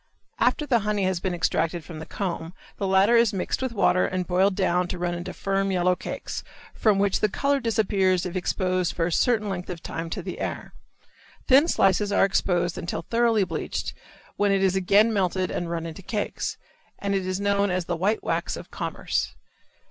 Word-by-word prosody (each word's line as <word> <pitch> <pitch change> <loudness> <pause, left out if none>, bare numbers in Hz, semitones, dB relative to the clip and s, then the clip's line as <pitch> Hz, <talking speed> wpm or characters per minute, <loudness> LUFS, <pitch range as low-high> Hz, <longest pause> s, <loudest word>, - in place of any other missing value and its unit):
After 300 - +2
the 245 -5 +3
honey 210 -1 -1
has 185 -2 0
been 180 0 -2
extracted 165 0 0
from 160 0 -9
the 160 - -8
comb 175 -3 -4 0.2
the 200 - -1
latter 195 +4 +4
is 230 -2 +4
mixed 190 +5 -2
with 260 -1 -1
water 185 -4 +3
and 185 -1 -2
boiled 190 +2 +2
down 180 -2 +1
and - - -3
run 175 0 -1
into 175 0 -5
firm 195 0 -1
yellow 180 0 +2
cakes, - - -6 0.3
from 215 -3 +2
which 200 -1 +2
the 215 - +2
color 280 +6 +1
disappears 195 -6 +1
if 180 0 -5
exposed 185 -1 0
for 165 - +1
a 175 - -2
certain 220 +3 +2
length 180 -2 -4
of 175 -2 -6
time 165 0 -5
to 180 - -4
the 185 - -6
air. - - -4 0.7
Thin 275 +5 +6
slices 200 - +2
are 200 - +4
exposed 180 -3 0
until 170 - -4
thoroughly 230 0 +2
bleached, 165 -4 -3 0.4
when 205 -1 +2
it 195 0 +2
is 190 -1 +3
again 200 +4 +4
melted 185 -2 0
and 175 - -3
run 165 -1 -3
into 165 +3 -7
cakes, 205 +2 -3 0.4
and 200 0 -2
is 185 -1 -1
then 200 - -5
known 200 0 +2
as 180 -1 -1
the 175 - -2
white 200 +6 0
wax - - -1
of - - -10
commerce. - - -2
190 Hz, 200 wpm, -25 LUFS, 180-205 Hz, 0.7 s, Thin